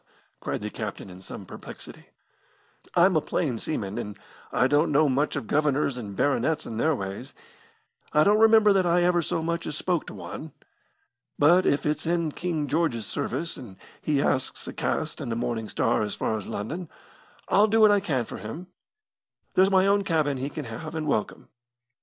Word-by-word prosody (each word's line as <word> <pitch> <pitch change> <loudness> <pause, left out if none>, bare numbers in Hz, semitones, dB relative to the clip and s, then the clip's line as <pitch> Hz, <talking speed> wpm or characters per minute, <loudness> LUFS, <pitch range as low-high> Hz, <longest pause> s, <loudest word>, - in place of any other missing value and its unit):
cried - - -3
the 105 0 -4
captain 105 -3 -6
in 90 +1 -12
some 95 +1 -8
perplexity, - - -10 0.9
"I'm 180 +1 +5
a 155 - +4
plain 130 -9 -1
seaman, 105 -10 -3
and 105 0 -6 0.3
I 125 - +3
don't 145 +5 +3
know 150 +2 +4
much 140 +3 +1
of - - -3
governors 145 +1 +1
and 105 -5 -6
baronets 155 +4 +1
and 115 -1 -5
their 155 +3 +2
ways. 95 -3 -6 0.8
I 150 - +5
don't 210 +4 +4
remember 220 -2 +6
that 190 -2 +3
I 175 +1 +3
ever 175 -1 +3
so 165 - -2
much 170 0 -2
as 150 - -3
spoke 175 -4 -1
to - - -8
one. 155 -2 -8 0.8
But 175 +5 +5
if 145 - +1
it's 150 +1 -1
in 170 -2 +1
King 160 -3 -2
George's 145 -9 0
service, 170 +10 -2
and 100 -7 -10 0.2
he 145 -2 +1
asks 130 - -1
a - - -5
cast 155 0 -2
in 135 - -4
the 115 - -1
Morning 115 -2 -2
Star 115 - +1
as 105 -1 -2
far 110 - -1
as 105 - -5
London, 155 - -5 0.6
I'll 205 +2 +5
do 220 +1 +2
what 215 -1 +8
I 205 - +4
can 145 -11 -1
for - - -8
him. 155 +12 -8 0.8
There's 190 +1 +5
my 190 -1 +4
own 200 0 +3
cabin 155 -6 +1
he 135 +2 -3
can 150 -1 -6
have 155 +8 -7
and 155 -1 -2
welcome. 125 -8 -2
150 Hz, 190 wpm, -26 LUFS, 120-170 Hz, 0.9 s, what